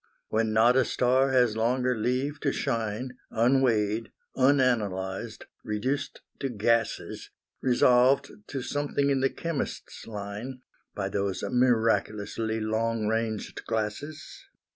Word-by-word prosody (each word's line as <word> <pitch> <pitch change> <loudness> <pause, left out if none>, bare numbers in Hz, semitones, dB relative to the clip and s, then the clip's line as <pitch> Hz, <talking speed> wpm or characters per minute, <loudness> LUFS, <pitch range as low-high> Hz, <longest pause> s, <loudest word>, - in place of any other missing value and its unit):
When 110 0 +1
not 115 +3 +5
a 130 - +5
star 130 +2 +2
has 125 -4 +3
longer 125 +3 +1
leave 130 +6 -1
to 140 - 0
shine, 120 0 -2
Unweighed, 115 -3 +2 0.2
unanalysed, 115 -6 +1 0.2
reduced 130 +7 -2 0.2
to 135 - -2
gases, 115 0 0 0.3
Resolved 125 +1 +4 0.2
to 135 -3 -4
something 145 0 0
in 135 - +2
the 135 - +3
chemist's 165 -4 -5
line, 110 +5 -6 0.3
By 95 -1 -2
those 100 -1 -2
miraculously 110 -2 +1
long 110 0 -1
ranged 110 -1 -2
glasses. 145 - -4
115 Hz, 110 wpm, -27 LUFS, 110-130 Hz, 0.3 s, not